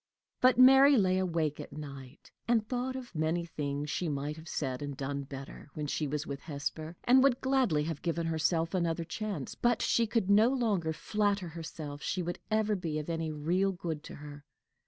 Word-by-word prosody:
But 255 Hz, 0 st, +5 dB
Mary 270 Hz, +2 st, +8 dB
lay 185 Hz, -3 st, +3 dB
awake 165 Hz, -5 st, -1 dB
at -, -, -8 dB
night, 140 Hz, -2 st, -10 dB, 0.2 s
and 225 Hz, -3 st, +2 dB
thought 255 Hz, +1 st, -2 dB
of 255 Hz, -4 st, -7 dB
many 160 Hz, +2 st, 0 dB
things 145 Hz, -2 st, -3 dB
she 175 Hz, -, -1 dB
might 145 Hz, +1 st, -3 dB
have 160 Hz, +1 st, -12 dB
said 130 Hz, -3 st, -2 dB
and 145 Hz, -2 st, -5 dB
done 140 Hz, +1 st, -3 dB
better 135 Hz, +1 st, -9 dB
when 150 Hz, -, -3 dB
she 150 Hz, +1 st, -1 dB
was 150 Hz, +2 st, -2 dB
with 140 Hz, -1 st, -5 dB
Hesper, 155 Hz, +2 st, -5 dB
and 255 Hz, +2 st, +6 dB
would 265 Hz, -2 st, +4 dB
gladly 260 Hz, -, +2 dB
have 160 Hz, -1 st, -4 dB
given 170 Hz, -1 st, -1 dB
herself 165 Hz, +1 st, 0 dB
another 170 Hz, -2 st, 0 dB
chance; 180 Hz, -, -4 dB
but 240 Hz, -1 st, +1 dB
she 230 Hz, -1 st, +2 dB
could 215 Hz, -3 st, 0 dB
no 210 Hz, +4 st, +6 dB
longer 215 Hz, -11 st, 0 dB
flatter 200 Hz, +1 st, -1 dB
herself 155 Hz, -3 st, -7 dB
she 180 Hz, +2 st, -2 dB
would 175 Hz, +1 st, -4 dB
ever 215 Hz, -1 st, +2 dB
be 165 Hz, -5 st, -3 dB
of 155 Hz, +2 st, -3 dB
any 165 Hz, -1 st, -2 dB
real 175 Hz, +6 st, +1 dB
good 165 Hz, -4 st, -4 dB
to -, -, -8 dB
her. 145 Hz, 0 st, -10 dB
165 Hz, 195 wpm, -31 LUFS, 150-210 Hz, 0.2 s, Mary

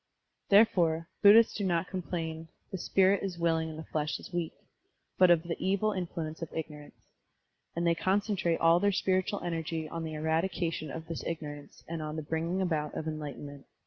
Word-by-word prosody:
Therefore, 170 Hz, -6 st, +4 dB
Bud 205 Hz, 0 st, +9 dB
dhists 230 Hz, +1 st, +6 dB
do 205 Hz, -, -3 dB
not 175 Hz, -2 st, +1 dB
complain, 165 Hz, -3 st, -4 dB, 0.2 s
"The 190 Hz, -, -4 dB
spirit 190 Hz, +2 st, +3 dB
is 190 Hz, -3 st, -4 dB
willing, 165 Hz, -1 st, +1 dB
and 155 Hz, -, -8 dB
the 160 Hz, -, -6 dB
flesh 155 Hz, -1 st, -2 dB
is -, -, -12 dB
weak"; 175 Hz, -2 st, -1 dB, 0.7 s
but 185 Hz, -1 st, +7 dB
of 170 Hz, -2 st, +5 dB
the 170 Hz, -1 st, -3 dB
evil 200 Hz, +3 st, +1 dB
influence 170 Hz, -4 st, -4 dB
of 165 Hz, -, -5 dB
ignorance; 150 Hz, -2 st, -8 dB, 0.6 s
and 170 Hz, +1 st, -1 dB
they 170 Hz, -, +4 dB
concentrate 190 Hz, -1 st, +1 dB
all 165 Hz, +1 st, +5 dB
their 205 Hz, +1 st, +3 dB
spiritual 190 Hz, +1 st, 0 dB
energy 165 Hz, -2 st, -3 dB
on 165 Hz, +1 st, -5 dB
the 160 Hz, -1 st, -5 dB
eradication 160 Hz, 0 st, -1 dB
of 160 Hz, +3 st, -7 dB
this 165 Hz, -2 st, -5 dB
ignor 155 Hz, -3 st, -4 dB
ance 145 Hz, -, -17 dB
and 165 Hz, -1 st, -4 dB
on 155 Hz, 0 st, -4 dB
the 155 Hz, -, -4 dB
bringing 165 Hz, +5 st, -1 dB
about 155 Hz, -4 st, -1 dB
of 160 Hz, -, -4 dB
enlightenment. 145 Hz, -2 st, -6 dB
165 Hz, 185 wpm, -30 LUFS, 160-185 Hz, 0.7 s, Bud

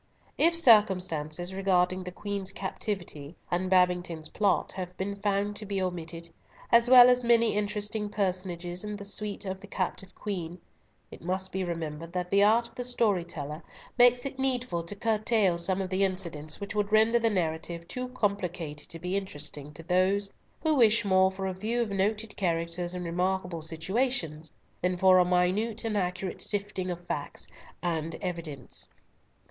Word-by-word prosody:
If 335 Hz, +1 st, +4 dB
circumstances 185 Hz, -, +3 dB
regarding 185 Hz, -1 st, +1 dB
the 180 Hz, -, -6 dB
Queen's 200 Hz, 0 st, -4 dB
captivity 180 Hz, -6 st, -5 dB, 0.2 s
and 180 Hz, +1 st, 0 dB
Babington's 180 Hz, -3 st, +2 dB
plot 205 Hz, -2 st, +1 dB
have 180 Hz, -1 st, -6 dB
been 200 Hz, +1 st, -3 dB
found 200 Hz, 0 st, -1 dB
to 215 Hz, -, -6 dB
be 200 Hz, -1 st, -1 dB
omitted, 170 Hz, -2 st, -4 dB, 0.4 s
as 235 Hz, +1 st, +6 dB
well 250 Hz, -1 st, +10 dB
as 250 Hz, 0 st, +4 dB
many 235 Hz, -1 st, +4 dB
interesting 210 Hz, 0 st, -2 dB
personages 180 Hz, -3 st, -2 dB
in 210 Hz, 0 st, -4 dB
the 200 Hz, -1 st, -5 dB
suite 205 Hz, 0 st, -1 dB
of 190 Hz, 0 st, -4 dB
the 205 Hz, -, -12 dB
captive 190 Hz, 0 st, -3 dB
Queen, 180 Hz, -4 st, -5 dB, 0.5 s
it -, -, -11 dB
must 185 Hz, +2 st, -1 dB
be 190 Hz, 0 st, -2 dB
remembered 165 Hz, -1 st, -5 dB
that 180 Hz, -1 st, -3 dB
the 200 Hz, 0 st, +5 dB
art 230 Hz, +3 st, +4 dB
of -, -, -22 dB
the 250 Hz, -, -4 dB
story 225 Hz, -7 st, +2 dB
teller 150 Hz, -2 st, -6 dB, 0.3 s
makes 245 Hz, 0 st, +5 dB
it 265 Hz, -1 st, -5 dB
needful 250 Hz, -9 st, 0 dB
to 205 Hz, -, -4 dB
curtail 215 Hz, -4 st, +2 dB
some 190 Hz, +2 st, 0 dB
of 185 Hz, -, -6 dB
the 190 Hz, +1 st, +2 dB
incidents 170 Hz, -5 st, -2 dB
which 200 Hz, +1 st, -5 dB
would 210 Hz, -1 st, -1 dB
render 220 Hz, +2 st, +5 dB
the 230 Hz, 0 st, +2 dB
narrative 170 Hz, -2 st, -2 dB
too 250 Hz, 0 st, -4 dB
complicated 180 Hz, -10 st, -3 dB
to 165 Hz, -, -5 dB
be 180 Hz, +3 st, -3 dB
interesting 150 Hz, -6 st, -4 dB
to 150 Hz, +2 st, -11 dB
those 190 Hz, +3 st, +2 dB, 0.3 s
who 315 Hz, -1 st, +3 dB
wish 230 Hz, -4 st, +4 dB
more 190 Hz, -1 st, +4 dB
for 190 Hz, 0 st, -5 dB
a 190 Hz, -, -1 dB
view 220 Hz, +6 st, -2 dB
of 230 Hz, -4 st, 0 dB
noted 210 Hz, +2 st, -1 dB
characters 175 Hz, 0 st, -1 dB
in 180 Hz, -, -4 dB
remarkable 180 Hz, 0 st, -1 dB
situations, 165 Hz, -, -2 dB, 0.3 s
than 180 Hz, 0 st, 0 dB
for 185 Hz, 0 st, +6 dB
a -, -, +6 dB
minute 185 Hz, +6 st, +1 dB
and 225 Hz, -2 st, -1 dB
accurate 185 Hz, -1 st, -2 dB
sifting 200 Hz, -3 st, -1 dB
of 175 Hz, 0 st, -5 dB
facts 145 Hz, -, -4 dB, 0.4 s
and 165 Hz, -2 st, -1 dB
evidence. 165 Hz, -7 st, -4 dB
190 Hz, 170 wpm, -28 LUFS, 175-210 Hz, 0.5 s, well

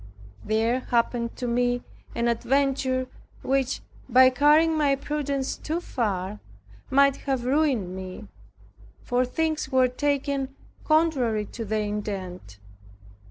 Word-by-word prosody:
There 225 Hz, +3 st, +1 dB
happened 235 Hz, -1 st, 0 dB
to 250 Hz, -, -5 dB
me 245 Hz, +1 st, +1 dB, 0.3 s
an 235 Hz, 0 st, 0 dB
adventure 260 Hz, +2 st, +1 dB, 0.4 s
which, 270 Hz, -1 st, 0 dB, 0.3 s
by 255 Hz, +1 st, +7 dB
carrying 300 Hz, +4 st, +4 dB
my 290 Hz, -3 st, +3 dB
prudence 280 Hz, -1 st, -2 dB
too 320 Hz, +3 st, -3 dB
far, 205 Hz, -, -2 dB, 0.5 s
might 275 Hz, 0 st, +4 dB
have 265 Hz, -3 st, -2 dB
ruined 255 Hz, -, +1 dB
me, 190 Hz, +2 st, -8 dB, 0.8 s
for 245 Hz, +1 st, +1 dB
things 310 Hz, +1 st, -2 dB
were 260 Hz, -1 st, +4 dB
taken 275 Hz, 0 st, -1 dB, 0.3 s
contrary 275 Hz, -10 st, +2 dB
to 230 Hz, +2 st, -7 dB
their 215 Hz, +1 st, -1 dB
intent. 195 Hz, -, -5 dB
255 Hz, 115 wpm, -25 LUFS, 225-280 Hz, 0.8 s, by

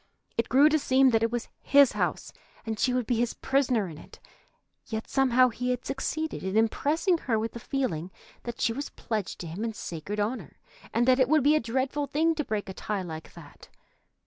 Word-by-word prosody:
It 230 Hz, -, -1 dB
grew 275 Hz, +4 st, +6 dB
to 310 Hz, 0 st, +2 dB
seem 265 Hz, -1 st, +4 dB
that 225 Hz, -1 st, +3 dB
it 230 Hz, -, +2 dB
was 240 Hz, -1 st, -3 dB
his 280 Hz, -1 st, +5 dB
house, -, -, -2 dB, 0.3 s
and 220 Hz, -1 st, -3 dB
she 255 Hz, -, +2 dB
would 250 Hz, -1 st, 0 dB
be 240 Hz, +1 st, 0 dB
his 235 Hz, 0 st, 0 dB
prisoner 255 Hz, -7 st, +1 dB
in 160 Hz, -3 st, -9 dB
it. -, -, -14 dB, 0.7 s
Yet 220 Hz, -1 st, -4 dB
somehow 255 Hz, -2 st, +4 dB
he 250 Hz, +2 st, -3 dB
had 250 Hz, -1 st, -2 dB
succeeded 315 Hz, +3 st, -3 dB
in 190 Hz, +2 st, -1 dB
impressing 305 Hz, -, +2 dB
her 230 Hz, -7 st, 0 dB
with 220 Hz, +1 st, -2 dB
the 235 Hz, -, -8 dB
feeling 225 Hz, -, -2 dB, 0.3 s
that 235 Hz, -1 st, -7 dB
she 230 Hz, -, +1 dB
was 280 Hz, +4 st, -5 dB
pledged 215 Hz, -4 st, -4 dB
to 170 Hz, -, -6 dB
him 170 Hz, +7 st, -5 dB
in 230 Hz, -1 st, -2 dB
sacred 175 Hz, +5 st, -5 dB
honor, 215 Hz, +5 st, -3 dB, 0.3 s
and 240 Hz, +2 st, +1 dB
that 255 Hz, 0 st, +5 dB
it 260 Hz, -1 st, +3 dB
would 310 Hz, -2 st, +4 dB
be 295 Hz, +2 st, +5 dB
a -, -, +4 dB
dreadful 265 Hz, +4 st, -1 dB
thing 315 Hz, +4 st, +2 dB
to 305 Hz, -1 st, -2 dB
break 215 Hz, -5 st, -3 dB
a 190 Hz, -, -6 dB
tie 205 Hz, 0 st, -3 dB
like 160 Hz, -2 st, -8 dB
that. -, -, -14 dB
240 Hz, 215 wpm, -27 LUFS, 220-275 Hz, 0.7 s, grew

